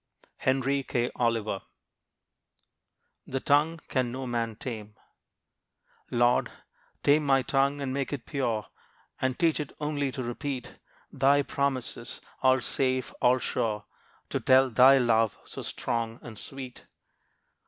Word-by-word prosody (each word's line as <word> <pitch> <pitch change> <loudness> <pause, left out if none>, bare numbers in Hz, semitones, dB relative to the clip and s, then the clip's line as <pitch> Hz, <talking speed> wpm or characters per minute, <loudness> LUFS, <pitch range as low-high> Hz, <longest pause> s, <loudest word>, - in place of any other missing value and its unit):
Henry 135 +1 +1
K. 120 -2 -1
Oliver. 115 -4 0 1.7
The 135 - -2
Tongue 150 +5 +2
Can 125 -3 0
No 130 +1 -4
Man 115 -2 -2
Tame 110 -3 -7 1.1
Lord, 120 0 +3 0.5
tame 150 +2 +4
my 135 -2 +3
tongue, 140 +2 +1
and 130 -2 -2
make 140 0 -2
it 140 -5 -4
pure, 120 -7 -1 0.6
And 130 -1 0
teach 165 -2 +2
it 150 - -4
only 145 -2 -1
to 130 - -3
repeat 125 +2 -5 0.3
Thy 140 +2 +4
promises, 135 -4 -2 0.2
all 130 -1 +4
safe, 130 +2 0
all 125 +1 +5
sure; 110 -4 -2 0.4
To - - -1
tell 130 0 +5
thy 130 +4 +7
love, 115 -3 +2
so - - -7
strong 115 -1 -3
and 110 -3 -9
sweet. 130 -2 -9
130 Hz, 125 wpm, -28 LUFS, 120-140 Hz, 1.7 s, thy